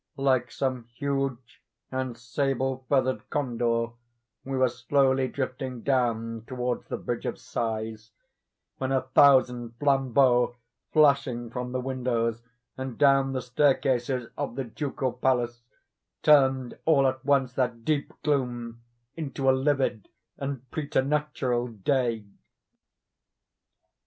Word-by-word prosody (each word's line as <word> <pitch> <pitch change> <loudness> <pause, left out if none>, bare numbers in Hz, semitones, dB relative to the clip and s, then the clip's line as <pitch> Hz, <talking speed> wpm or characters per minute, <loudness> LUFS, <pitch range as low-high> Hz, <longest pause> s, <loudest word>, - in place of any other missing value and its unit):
Like 130 -3 +2
some 130 -3 -2
huge 135 -3 -3 0.3
and 130 -2 -3
sable 130 +1 -1
feathered 130 -2 +1
condor, 120 -4 0 0.5
we 135 0 -3
were 130 0 +4
slowly 130 +2 +2
drifting 130 -2 -4
down 115 -4 0
towards 125 -1 -3
the - - -3
Bridge - - -4
of - - -3
Sighs, 110 -1 -4 0.7
when 130 0 -1
a 130 -1 +2
thousand 130 -3 +4
flambeaux 130 -3 +3 0.4
flashing 140 -6 +3
from 125 +1 -4
the 130 - -1
windows, 120 -3 -1 0.3
and 130 -2 -5
down 135 -2 +4
the 130 - -2
staircases 130 -1 +1
of 115 - -3
the 135 - -2
Ducal 130 +1 -3
Palace, 120 -2 0 0.6
turned 135 -4 +4
all 145 -4 +4
at 130 0 0
once 135 -3 +2
that 125 -3 -1
deep 150 -2 0
gloom 120 -5 -1 0.3
into 140 -4 -3
a - - +8
livid 130 -5 0 0.3
and 135 -2 -5
preternatural 145 -4 0
day. 115 0 -1
130 Hz, 115 wpm, -27 LUFS, 120-135 Hz, 0.7 s, a